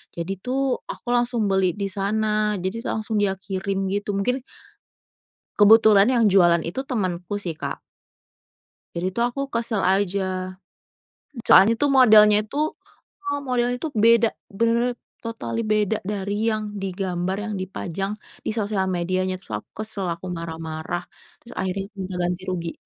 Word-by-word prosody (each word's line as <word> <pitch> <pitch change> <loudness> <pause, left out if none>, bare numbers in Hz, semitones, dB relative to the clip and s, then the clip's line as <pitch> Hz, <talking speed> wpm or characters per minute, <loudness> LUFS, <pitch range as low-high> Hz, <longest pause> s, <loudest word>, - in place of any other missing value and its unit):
jadi 175 +3 -4
tuh 260 +4 0
aku 240 - -8
langsung 240 -3 +1
beli 190 -2 +2
di 200 +1 -3
sana, 210 +2 0
jadi 195 +6 -4
langsung 220 0 -2
dia 205 -2 +2
kirim 195 0 -3
gitu 205 +1 -2
mungkin 220 +7 0 1.2
kebetulan 210 -1 +7
yang 235 -4 +4
jualan 175 -4 +5
itu 260 +11 -3
temenku 195 -6 -2
sih 170 -5 -4
Kak. - - -5 1.2
Jadi 170 +2 -1
tuh 235 +5 0
aku 245 +3 -4
kesel 230 -3 -1
aja. 185 -1 0 0.9
Soalnya 195 +5 +7
tuh 290 - +3
modelnya 215 -4 +7
tuh 295 +2 +1 0.6
heeh, 285 -7 -2
modelnya 245 -1 +1
tuh 310 - -3
beda, 230 0 +6 0.3
bener-bener 235 +1 +2 0.3
totally 230 0 -3
beda 215 0 +2
dari 200 -1 -3 0.2
yang 215 0 -2 0.2
di 195 - -2
gambar 185 0 -1
yang 215 - -4
dipajang 190 +1 -4 0.3
di - - 0
sosial 205 -3 0
medianya, 185 +2 -1
terus 185 - -16
aku - - -24
kesel, 210 -3 -5
aku 170 +2 -9
marah-marah, 160 0 -5 0.4
terus 240 - -12
akhirnya 190 +1 -2
minta 185 -1 -4
ganti 175 +1 -1
rugi. 170 -2 -3
200 Hz, 145 wpm, -23 LUFS, 185-230 Hz, 1.2 s, kebetulan